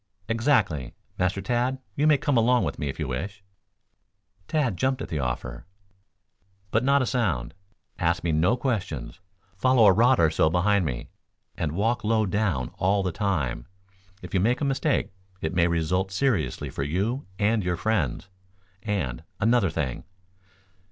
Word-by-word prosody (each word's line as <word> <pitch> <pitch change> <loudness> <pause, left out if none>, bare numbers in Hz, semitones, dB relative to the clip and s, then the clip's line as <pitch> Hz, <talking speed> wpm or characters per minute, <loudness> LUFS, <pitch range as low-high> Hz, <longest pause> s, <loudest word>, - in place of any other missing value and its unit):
"Exactly. 110 - +1 0.2
Master 90 +2 0
Tad, 125 +2 0 0.2
you 150 +2 +2
may 150 -2 +6
come 140 +1 0
along 120 +1 +4
with - - -3
me 75 - -2
if - - -5
you - - -2
wish." 100 +11 -5 1.0
Tad 145 -10 0
jumped 130 +8 0
at - - -8
the 80 - -2
offer. 60 +1 -4 1.0
"But 115 - +2
not 140 +1 +4
a - - 0
sound. 85 - -1 0.5
Ask - - +1
me 85 - +1
no 85 +11 +2
questions. 95 - -3 0.4
Follow 130 +2 +4
a 100 - +7
rod 120 +5 +4
or 80 -2 +4
so 80 - +3
behind 90 +3 +2
me, - - -4 0.4
and 75 -2 -2
walk 110 +5 0
low 110 0 +2
down 95 - 0
all 100 +1 +2
the 90 - -1
time. 80 - -2 0.6
If 90 - -9
you 95 - +3
make 120 +7 +2
a 145 - -1
mistake 140 +1 0 0.3
it 80 -1 -3
may 85 -1 +3
result 85 +3 0
seriously 105 - 0
for - - -4
you 100 - -1
and 105 +1 +2
your 90 -1 -1
friends. 95 - -1 0.5
And, 90 - -2 0.2
another 115 -2 +3
thing." 75 -6 -3
100 Hz, 160 wpm, -26 LUFS, 80-120 Hz, 1.0 s, a